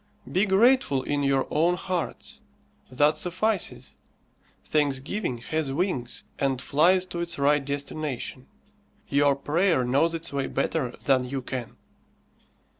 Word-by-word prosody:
Be 195 Hz, +4 st, +2 dB
grateful 195 Hz, -, +3 dB
in 145 Hz, +1 st, -1 dB
your 140 Hz, -1 st, +2 dB
own 170 Hz, +4 st, +3 dB
hearts. 180 Hz, -2 st, -4 dB, 0.5 s
That 145 Hz, +4 st, +2 dB
suffices. 185 Hz, +3 st, -1 dB, 0.7 s
Thanksgiving 145 Hz, -, -1 dB
has 145 Hz, +4 st, -2 dB
wings, 135 Hz, -6 st, -2 dB, 0.2 s
and 135 Hz, -2 st, 0 dB
flies 180 Hz, +8 st, +3 dB
to 175 Hz, -2 st, -6 dB
its 170 Hz, 0 st, -3 dB
right 145 Hz, +1 st, +3 dB
destination. 140 Hz, -2 st, -4 dB, 0.6 s
Your 140 Hz, 0 st, +3 dB
prayer 150 Hz, 0 st, +1 dB
knows 145 Hz, +7 st, +2 dB
its 165 Hz, -2 st, -5 dB
way 140 Hz, -1 st, -1 dB
better 125 Hz, -7 st, -1 dB
than 130 Hz, -2 st, +2 dB
you 135 Hz, -1 st, -3 dB
can. 125 Hz, -3 st, -5 dB
145 Hz, 120 wpm, -26 LUFS, 135-170 Hz, 0.7 s, grateful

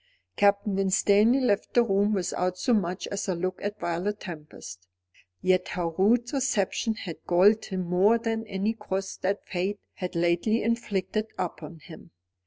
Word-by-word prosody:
Captain 200 Hz, 0 st, +2 dB
Winstanley 200 Hz, +5 st, +4 dB
left 205 Hz, -6 st, 0 dB
the 240 Hz, -, +6 dB
room 205 Hz, -1 st, +2 dB
without 180 Hz, -1 st, -1 dB
so 245 Hz, -, +1 dB
much 185 Hz, -3 st, 0 dB
as 200 Hz, +1 st, -3 dB
a 185 Hz, -, 0 dB
look 185 Hz, +2 st, -3 dB
at 205 Hz, +1 st, -4 dB
Violet 180 Hz, +5 st, -2 dB
Tempest. 150 Hz, -, -9 dB, 0.6 s
Yet 185 Hz, 0 st, +2 dB
her 175 Hz, -2 st, -2 dB
rude 225 Hz, -, +2 dB
reception 230 Hz, -4 st, 0 dB
had 175 Hz, -6 st, -7 dB
galled 200 Hz, +5 st, +4 dB
him 190 Hz, -2 st, -3 dB
more 190 Hz, +6 st, +4 dB
than 225 Hz, -1 st, -3 dB
any 200 Hz, +2 st, -1 dB
cross 195 Hz, -3 st, -4 dB
that 195 Hz, +2 st, -2 dB
fate 195 Hz, +3 st, -2 dB
had 180 Hz, -1 st, -6 dB
lately 175 Hz, +7 st, +1 dB
inflicted 215 Hz, -2 st, -1 dB
upon 165 Hz, -2 st, -5 dB
him. 160 Hz, +1 st, -13 dB
195 Hz, 155 wpm, -27 LUFS, 180-215 Hz, 0.6 s, the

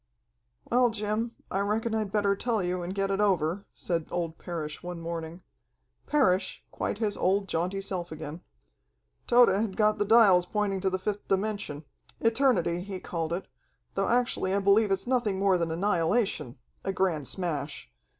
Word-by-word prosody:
"Well, 245 Hz, 0 st, +5 dB
Jim, 220 Hz, +2 st, -2 dB, 0.2 s
I 195 Hz, -, 0 dB
reckon 215 Hz, +3 st, 0 dB
I'd 215 Hz, -3 st, -1 dB
better 205 Hz, -1 st, +2 dB
tell 225 Hz, -1 st, -1 dB
you 180 Hz, 0 st, -1 dB
and 180 Hz, +2 st, -5 dB
get 195 Hz, 0 st, 0 dB
it 195 Hz, +1 st, +1 dB
over," 185 Hz, -1 st, +1 dB
said 165 Hz, -3 st, -2 dB
old 165 Hz, -2 st, -3 dB
Parrish 155 Hz, -3 st, -5 dB
one 175 Hz, -1 st, -6 dB
morning 165 Hz, +1 st, -6 dB, 0.6 s
Parrish, 200 Hz, -11 st, +1 dB
quite -, -, -3 dB
his 210 Hz, -2 st, -1 dB
old, 195 Hz, +2 st, +1 dB
jaunty 180 Hz, +3 st, -1 dB
self 180 Hz, -3 st, -4 dB
again. 155 Hz, +1 st, -7 dB, 0.9 s
"Tode 245 Hz, 0 st, +7 dB
had 195 Hz, 0 st, 0 dB
got 215 Hz, 0 st, +3 dB
the 205 Hz, -, +2 dB
dials 195 Hz, -5 st, +6 dB
pointing 200 Hz, -2 st, -1 dB
to 190 Hz, -, +2 dB
the 185 Hz, -, -1 dB
fifth 205 Hz, +2 st, -4 dB
dimension 195 Hz, -7 st, -2 dB, 0.3 s
eternity, 225 Hz, -8 st, +2 dB
he 190 Hz, 0 st, -5 dB
called 165 Hz, -2 st, -3 dB
it, 175 Hz, +3 st, -2 dB, 0.5 s
though -, -, 0 dB
actually 240 Hz, -5 st, +1 dB
I -, -, +2 dB
believe 200 Hz, +2 st, +4 dB
it's 195 Hz, 0 st, 0 dB
nothing 240 Hz, -6 st, +1 dB
more 190 Hz, -2 st, +3 dB
than 170 Hz, -1 st, 0 dB
annihilation, 170 Hz, -, 0 dB, 0.3 s
a 195 Hz, -, -1 dB
grand 175 Hz, -7 st, 0 dB
smash. 150 Hz, -6 st, -3 dB
195 Hz, 165 wpm, -28 LUFS, 175-210 Hz, 0.9 s, Tode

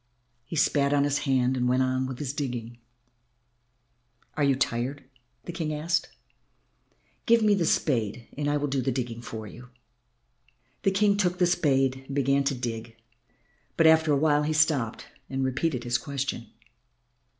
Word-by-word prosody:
He 165 Hz, -, -7 dB
spat 145 Hz, -2 st, +2 dB
on 140 Hz, -1 st, +3 dB
his 145 Hz, 0 st, +1 dB
hand 130 Hz, -1 st, +2 dB
and 125 Hz, -1 st, 0 dB
went 130 Hz, +1 st, +3 dB
on 130 Hz, 0 st, 0 dB
with 130 Hz, -1 st, -6 dB
his 140 Hz, -1 st, -4 dB
digging. 120 Hz, -5 st, -5 dB, 1.6 s
"You 140 Hz, -2 st, +3 dB
are -, -, -1 dB
tired," 135 Hz, +2 st, -2 dB, 0.4 s
the -, -, -5 dB
King 165 Hz, -2 st, -3 dB, 0.2 s
said; 170 Hz, 0 st, +1 dB, 1.2 s
"give 230 Hz, -1 st, +5 dB
me 210 Hz, -1 st, +4 dB
the 175 Hz, -5 st, +1 dB
spade 115 Hz, -4 st, 0 dB
and 145 Hz, 0 st, -1 dB
I 145 Hz, -, +1 dB
will 145 Hz, -, -1 dB
do 135 Hz, -1 st, -1 dB
the 130 Hz, -, 0 dB
digging 120 Hz, -2 st, -4 dB
for 110 Hz, -2 st, -7 dB
you." 120 Hz, +4 st, -12 dB, 1.1 s
The -, -, +3 dB
King 200 Hz, +1 st, +2 dB
took 180 Hz, -3 st, +1 dB
the 180 Hz, -, +3 dB
spade 135 Hz, -6 st, +1 dB
and 135 Hz, -, -6 dB
began 140 Hz, 0 st, +2 dB
to 140 Hz, -, +1 dB
dig, 115 Hz, -2 st, -5 dB, 0.8 s
but 165 Hz, -, +4 dB
after 160 Hz, -1 st, +5 dB
a 145 Hz, -, +4 dB
while 150 Hz, 0 st, +3 dB
he 150 Hz, +1 st, -1 dB
stopped 150 Hz, -7 st, +1 dB, 0.2 s
and 135 Hz, 0 st, -1 dB
repeated 130 Hz, 0 st, -1 dB
his 120 Hz, 0 st, 0 dB
question. 135 Hz, -5 st, -4 dB
135 Hz, 165 wpm, -27 LUFS, 125-155 Hz, 1.6 s, give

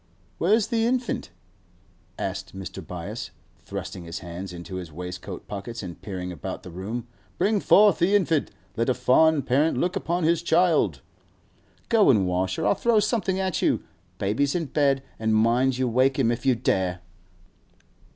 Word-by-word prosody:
'Where's 210 Hz, +5 st, +3 dB
the 230 Hz, -2 st, +1 dB
infant?' 245 Hz, +1 st, -1 dB, 0.9 s
asked -, -, -5 dB
Mr. 95 Hz, -2 st, -7 dB
Byass, -, -, -6 dB, 0.3 s
thrusting 90 Hz, -, -7 dB
his 85 Hz, 0 st, -6 dB
hands 90 Hz, +2 st, -7 dB
into 90 Hz, +1 st, -7 dB
his 90 Hz, -3 st, -7 dB
waistcoat 90 Hz, +3 st, -7 dB
pockets 105 Hz, +3 st, -6 dB
and 85 Hz, -2 st, -8 dB
peering 90 Hz, -3 st, -5 dB
about 85 Hz, -, -6 dB
the 90 Hz, -, -9 dB
room. 105 Hz, +7 st, -5 dB, 0.3 s
'Bring 210 Hz, 0 st, +2 dB
forth 205 Hz, -1 st, +5 dB
the 185 Hz, +4 st, +3 dB
infant! 170 Hz, -7 st, +2 dB, 0.3 s
Let 115 Hz, +2 st, 0 dB
a 130 Hz, -, +2 dB
fond 140 Hz, +3 st, +4 dB
parent 145 Hz, +6 st, +2 dB
look 180 Hz, +2 st, 0 dB
upon 175 Hz, -2 st, -1 dB
his 165 Hz, +1 st, +2 dB
child.' 160 Hz, -, +2 dB, 0.9 s
'Go 220 Hz, -3 st, +5 dB
an' 105 Hz, -7 st, +4 dB
wash, 90 Hz, +1 st, -1 dB
or -, -, -1 dB
I'll 105 Hz, -, +4 dB
throw 235 Hz, -2 st, +2 dB
something 205 Hz, -3 st, 0 dB
at 190 Hz, -2 st, -1 dB
you. -, -, +1 dB, 0.3 s
Baby's 115 Hz, -, 0 dB
in 170 Hz, -2 st, 0 dB
bed, 140 Hz, -1 st, +1 dB, 0.2 s
and 110 Hz, 0 st, +1 dB
mind, 120 Hz, +4 st, +3 dB
you 130 Hz, -1 st, +1 dB
wake 130 Hz, +3 st, +2 dB
him 120 Hz, -4 st, +3 dB
if 120 Hz, +3 st, -3 dB
you 130 Hz, -, +5 dB
dare! 95 Hz, -5 st, 0 dB
130 Hz, 165 wpm, -25 LUFS, -, 0.9 s, forth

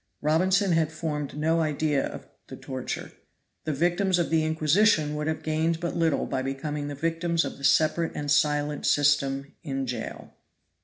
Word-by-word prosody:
Robinson 185 Hz, +6 st, +2 dB
had 160 Hz, -2 st, +2 dB
formed 150 Hz, -3 st, -4 dB
no 160 Hz, +2 st, +1 dB
idea 150 Hz, -2 st, 0 dB
of -, -, -7 dB, 0.2 s
the -, -, -8 dB
torture. 130 Hz, -1 st, -5 dB, 0.5 s
The 155 Hz, -, 0 dB
victims 175 Hz, +5 st, +1 dB
of 170 Hz, -2 st, -1 dB
the 160 Hz, -1 st, +3 dB
Inquisition 155 Hz, +1 st, +3 dB
would 150 Hz, 0 st, -3 dB
have 160 Hz, 0 st, -2 dB
gained 160 Hz, +1 st, 0 dB
but 170 Hz, -1 st, -3 dB
little 165 Hz, -3 st, +1 dB
by 130 Hz, -, -2 dB
becoming 145 Hz, +2 st, -3 dB
the 145 Hz, -, -5 dB
victims 165 Hz, +2 st, 0 dB
of -, -, -6 dB
the -, -, -12 dB
separate 160 Hz, +4 st, +2 dB
and 145 Hz, -1 st, -3 dB
silent 150 Hz, 0 st, +1 dB
system 140 Hz, -1 st, +2 dB
in 135 Hz, -4 st, -3 dB
Jail. 120 Hz, -3 st, -6 dB
155 Hz, 165 wpm, -26 LUFS, 145-165 Hz, 0.5 s, the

